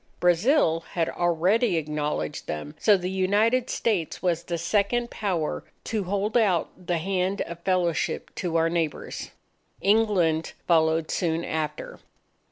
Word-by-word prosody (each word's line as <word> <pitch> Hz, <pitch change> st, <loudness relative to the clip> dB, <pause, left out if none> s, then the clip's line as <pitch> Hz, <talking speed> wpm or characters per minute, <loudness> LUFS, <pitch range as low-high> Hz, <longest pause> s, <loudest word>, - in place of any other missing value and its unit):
Brazil 175 Hz, -, +3 dB
had 165 Hz, -2 st, 0 dB
already 175 Hz, +5 st, +2 dB
acknowledged 150 Hz, -, -3 dB
them; 75 Hz, -1 st, -5 dB
so 210 Hz, -2 st, +5 dB
the 180 Hz, -1 st, -4 dB
United 210 Hz, +7 st, +2 dB
States 195 Hz, -9 st, -1 dB
was 175 Hz, -3 st, 0 dB
the 170 Hz, 0 st, -3 dB
second 210 Hz, +7 st, 0 dB
Power 180 Hz, -7 st, -2 dB, 0.2 s
to 215 Hz, -4 st, -2 dB
hold 200 Hz, +4 st, -1 dB
out 185 Hz, -5 st, +1 dB
the 175 Hz, -, +1 dB
hand 185 Hz, +3 st, -1 dB
of 170 Hz, 0 st, -5 dB
fellowship 175 Hz, -2 st, -1 dB
to 175 Hz, -3 st, -3 dB
our 165 Hz, 0 st, +3 dB
neighbours. 165 Hz, -3 st, -3 dB, 0.5 s
England 195 Hz, -7 st, +2 dB
followed 160 Hz, -1 st, +3 dB
soon 165 Hz, -1 st, 0 dB
after. 155 Hz, -1 st, -4 dB
175 Hz, 130 wpm, -26 LUFS, 165-200 Hz, 0.5 s, so